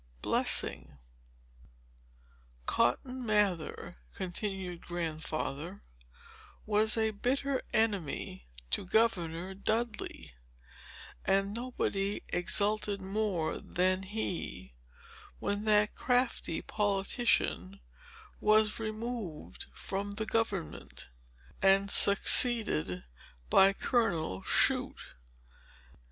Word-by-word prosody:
Chapter -, -, +6 dB
VI 65 Hz, -, -8 dB, 1.8 s
"Cotton 255 Hz, -, 0 dB
Mather," 205 Hz, -, 0 dB, 0.2 s
continued 185 Hz, -1 st, -4 dB
Grandfather, 165 Hz, 0 st, -4 dB, 0.8 s
"was 215 Hz, +1 st, +1 dB
a 220 Hz, 0 st, +2 dB
bitter 265 Hz, +5 st, -1 dB
enemy 195 Hz, -, -1 dB, 0.2 s
to -, -, 0 dB
Governor 185 Hz, -4 st, 0 dB
Dudley; 220 Hz, -, -3 dB, 0.9 s
and 195 Hz, +1 st, +1 dB
nobody 210 Hz, -4 st, -2 dB
exulted 205 Hz, +3 st, +1 dB
more 195 Hz, -4 st, -2 dB
than 185 Hz, +1 st, 0 dB
he, 185 Hz, -, -4 dB, 0.6 s
when 205 Hz, -, -2 dB
that 210 Hz, -1 st, +3 dB
crafty 245 Hz, -9 st, 0 dB
politician 200 Hz, -1 st, 0 dB, 0.6 s
was 215 Hz, 0 st, +3 dB
removed 220 Hz, -6 st, -5 dB
from 200 Hz, +1 st, -5 dB
the 220 Hz, +2 st, -4 dB
government, 220 Hz, -, -3 dB, 0.5 s
and 195 Hz, +1 st, +4 dB
succeeded 200 Hz, -, +4 dB, 0.5 s
by 195 Hz, +1 st, +7 dB
Colonel 175 Hz, -, -1 dB
Shute. -, -, 0 dB
200 Hz, 75 wpm, -31 LUFS, 180-220 Hz, 1.8 s, by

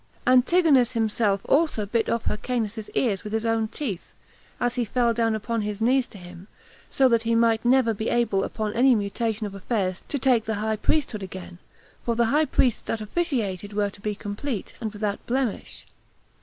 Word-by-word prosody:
Antigonus 255 Hz, -1 st, +4 dB
himself 220 Hz, -3 st, +1 dB
also 285 Hz, -8 st, +2 dB
bit 225 Hz, +3 st, 0 dB
off 230 Hz, -1 st, 0 dB
Hyrcanus's 220 Hz, -1 st, -2 dB
ears 210 Hz, -7 st, +1 dB
with 210 Hz, -, -6 dB
his 220 Hz, +1 st, -1 dB
own 225 Hz, -1 st, +1 dB
teeth, 215 Hz, -, -5 dB, 0.5 s
as 245 Hz, -1 st, 0 dB
he 245 Hz, -1 st, 0 dB
fell 235 Hz, +1 st, +1 dB
down 225 Hz, -1 st, +1 dB
upon 225 Hz, +1 st, -2 dB
his 210 Hz, -1 st, -3 dB
knees 250 Hz, +3 st, +2 dB
to -, -, -13 dB
him, 180 Hz, 0 st, -12 dB, 0.4 s
that -, -, -23 dB
so 260 Hz, -3 st, +5 dB
he 230 Hz, +1 st, 0 dB
might 230 Hz, -1 st, +3 dB
never 245 Hz, -2 st, +4 dB
be 220 Hz, +2 st, -3 dB
able 230 Hz, -5 st, +1 dB
upon 215 Hz, -2 st, -3 dB
any 250 Hz, +2 st, +5 dB
mutation 215 Hz, +1 st, -2 dB
of 200 Hz, -, -6 dB
affairs 195 Hz, -2 st, -2 dB
to 285 Hz, -, -2 dB
take 250 Hz, -4 st, +2 dB
the 220 Hz, -, -1 dB
high 220 Hz, +1 st, -1 dB
priesthood 235 Hz, -1 st, 0 dB
again, 185 Hz, -2 st, -8 dB, 0.4 s
for 235 Hz, -, 0 dB
the 235 Hz, 0 st, +3 dB
high 310 Hz, +1 st, +4 dB
priests 250 Hz, -5 st, +1 dB
that 225 Hz, -, -3 dB
officiated 215 Hz, -, -2 dB
were 205 Hz, -1 st, 0 dB
to 200 Hz, -, -16 dB
be 210 Hz, 0 st, -2 dB
complete, 205 Hz, +3 st, -5 dB
and 220 Hz, -2 st, -3 dB
without 205 Hz, -1 st, -3 dB
blemish. 255 Hz, -2 st, -2 dB
225 Hz, 185 wpm, -25 LUFS, 205-245 Hz, 0.5 s, so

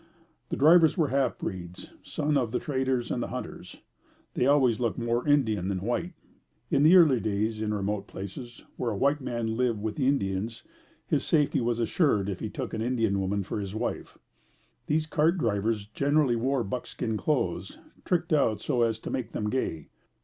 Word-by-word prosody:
The -, -, -2 dB
drivers 160 Hz, +3 st, +6 dB
were 155 Hz, -5 st, +2 dB
half 135 Hz, 0 st, +1 dB
breeds, 90 Hz, -2 st, -7 dB
sons 150 Hz, 0 st, -1 dB
of 125 Hz, -5 st, +1 dB
the -, -, 0 dB
traders 130 Hz, -3 st, -1 dB
and 120 Hz, -, -1 dB
hunters. 125 Hz, +1 st, -7 dB, 0.6 s
They 125 Hz, -, +1 dB
always 130 Hz, -5 st, +4 dB
looked 120 Hz, -3 st, -1 dB
more 120 Hz, +3 st, -1 dB
Indian 110 Hz, -10 st, +2 dB
than 95 Hz, -2 st, -2 dB
white. 120 Hz, -, -2 dB, 0.6 s
In 140 Hz, -3 st, +3 dB
the 160 Hz, +5 st, +7 dB
early 155 Hz, -9 st, +6 dB
days, 110 Hz, +1 st, -1 dB
in 110 Hz, -1 st, -1 dB
remote 100 Hz, -1 st, -2 dB
places, 120 Hz, +6 st, -8 dB
where 125 Hz, -, -1 dB
a 105 Hz, -, -3 dB
white 140 Hz, +5 st, +2 dB
man 115 Hz, -3 st, -2 dB
lived 120 Hz, -4 st, +1 dB
with 105 Hz, +1 st, -4 dB
the 135 Hz, -3 st, +1 dB
Indians, 110 Hz, -4 st, -1 dB, 0.4 s
his -, -, 0 dB
safety 150 Hz, -4 st, +2 dB
was 120 Hz, 0 st, 0 dB
assured 115 Hz, -, +1 dB
if 95 Hz, -, -4 dB
he -, -, -4 dB
took -, -, -5 dB
an 110 Hz, -, -2 dB
Indian 115 Hz, -4 st, +1 dB
woman 100 Hz, +1 st, -1 dB
for 100 Hz, -, -4 dB
his 100 Hz, 0 st, -5 dB
wife. 115 Hz, +2 st, -4 dB, 0.7 s
These 155 Hz, +1 st, +1 dB
cart 160 Hz, +3 st, +2 dB
drivers 110 Hz, -, 0 dB
generally 140 Hz, +3 st, +1 dB
wore 130 Hz, +2 st, 0 dB
buckskin 110 Hz, +1 st, -4 dB
clothes, 105 Hz, -, -1 dB, 0.3 s
tricked 170 Hz, -1 st, 0 dB
out 115 Hz, -8 st, +2 dB
so 120 Hz, -, 0 dB
as 115 Hz, -2 st, +2 dB
to -, -, -5 dB
make 125 Hz, -3 st, -3 dB
them 105 Hz, 0 st, -2 dB
gay. 130 Hz, -11 st, -2 dB
120 Hz, 180 wpm, -28 LUFS, 105-140 Hz, 0.7 s, the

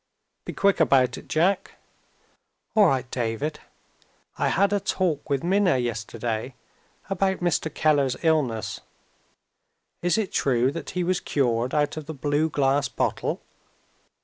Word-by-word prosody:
"Be -, -, -5 dB
quick 200 Hz, -3 st, +2 dB
about 130 Hz, -5 st, +3 dB
it, -, -, -16 dB
Jack." 180 Hz, +5 st, +1 dB, 1.0 s
"All 210 Hz, -3 st, +6 dB
right, 135 Hz, -4 st, +1 dB
David. 130 Hz, +6 st, -2 dB, 0.8 s
I -, -, 0 dB
had 200 Hz, +2 st, +2 dB
a 205 Hz, -, +2 dB
talk 170 Hz, -6 st, -1 dB
with 140 Hz, -2 st, 0 dB
Minna 185 Hz, -3 st, +3 dB
yesterday, 115 Hz, 0 st, -3 dB, 0.5 s
about 195 Hz, -1 st, 0 dB
Mr. 175 Hz, -2 st, 0 dB
Keller's 140 Hz, -4 st, +2 dB
illness. 140 Hz, -, 0 dB, 1.2 s
Is 175 Hz, +4 st, +2 dB
it 215 Hz, -4 st, -1 dB
true 130 Hz, -1 st, +2 dB
that 165 Hz, -, -6 dB
he 180 Hz, -, +1 dB
was 180 Hz, +1 st, +1 dB
cured 125 Hz, -2 st, 0 dB
out 145 Hz, 0 st, +1 dB
of 155 Hz, -2 st, -6 dB
the 160 Hz, -, -6 dB
blue 145 Hz, +3 st, 0 dB
glass 140 Hz, -2 st, +1 dB
bottle?" -, -, -2 dB
145 Hz, 135 wpm, -25 LUFS, 130-175 Hz, 1.2 s, All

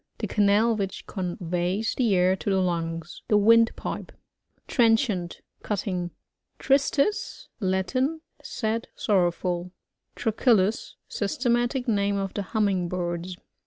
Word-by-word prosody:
The -, -, -3 dB
canal 210 Hz, +3 st, +3 dB
which 195 Hz, -2 st, -4 dB
conveys 180 Hz, +2 st, -2 dB
\ -, -, -13 dB
the 230 Hz, -6 st, +2 dB
air 180 Hz, +1 st, +3 dB
to 190 Hz, -, -4 dB
the 190 Hz, -1 st, +2 dB
lungs. 165 Hz, -2 st, -2 dB
The 210 Hz, -, +4 dB
windpipe. 230 Hz, +2 st, +2 dB, 0.6 s
Trenchant. 225 Hz, -7 st, +1 dB
— -, -, -47 dB
Cutting. 185 Hz, -4 st, -2 dB, 0.5 s
Tristis. 280 Hz, +9 st, +1 dB
— -, -, -50 dB
Latin. 255 Hz, -, 0 dB, 0.2 s
Sad, 230 Hz, -4 st, -3 dB
sorrowful. 180 Hz, -2 st, 0 dB, 0.5 s
Trochilus. 220 Hz, -2 st, +1 dB
— -, -, -53 dB
Systematic 240 Hz, +4 st, 0 dB
name 200 Hz, -2 st, +1 dB
of 195 Hz, -1 st, -3 dB
the 205 Hz, -, -2 dB
Humming 195 Hz, -3 st, 0 dB
birds. 175 Hz, 0 st, -3 dB
200 Hz, 125 wpm, -26 LUFS, 180-230 Hz, 0.6 s, The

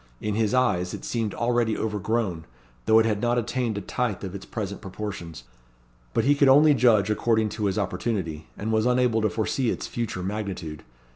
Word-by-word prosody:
In 105 Hz, -, -2 dB
his 110 Hz, 0 st, +1 dB
eyes 105 Hz, -9 st, +1 dB
it -, -, -9 dB
seemed 115 Hz, -3 st, -2 dB
already 120 Hz, -2 st, +1 dB
over 105 Hz, -2 st, -2 dB
grown, 100 Hz, -, -1 dB, 0.4 s
though 110 Hz, -, +6 dB
it 115 Hz, -, +5 dB
had 105 Hz, -2 st, 0 dB
not 120 Hz, 0 st, +1 dB
attained 120 Hz, -1 st, -1 dB
a -, -, -3 dB
tithe 110 Hz, 0 st, -2 dB
of 95 Hz, -2 st, -5 dB
its 95 Hz, -1 st, -8 dB
present 100 Hz, -3 st, -5 dB
proportions; 95 Hz, -, -6 dB, 0.7 s
but -, -, +3 dB
he 145 Hz, -, +4 dB
could 140 Hz, -1 st, +4 dB
only 150 Hz, +3 st, +7 dB
judge 110 Hz, -5 st, +4 dB
according 110 Hz, 0 st, +1 dB
to 105 Hz, 0 st, -3 dB
his 95 Hz, 0 st, 0 dB
opportunity, 90 Hz, -6 st, -2 dB
and 110 Hz, +2 st, -3 dB
was 110 Hz, +1 st, +2 dB
unable 125 Hz, -2 st, +2 dB
to 110 Hz, -, +2 dB
foresee 115 Hz, +5 st, -1 dB
its -, -, -3 dB
future 110 Hz, -6 st, -4 dB
magnitude. 95 Hz, -6 st, -4 dB
110 Hz, 195 wpm, -25 LUFS, 100-120 Hz, 0.7 s, only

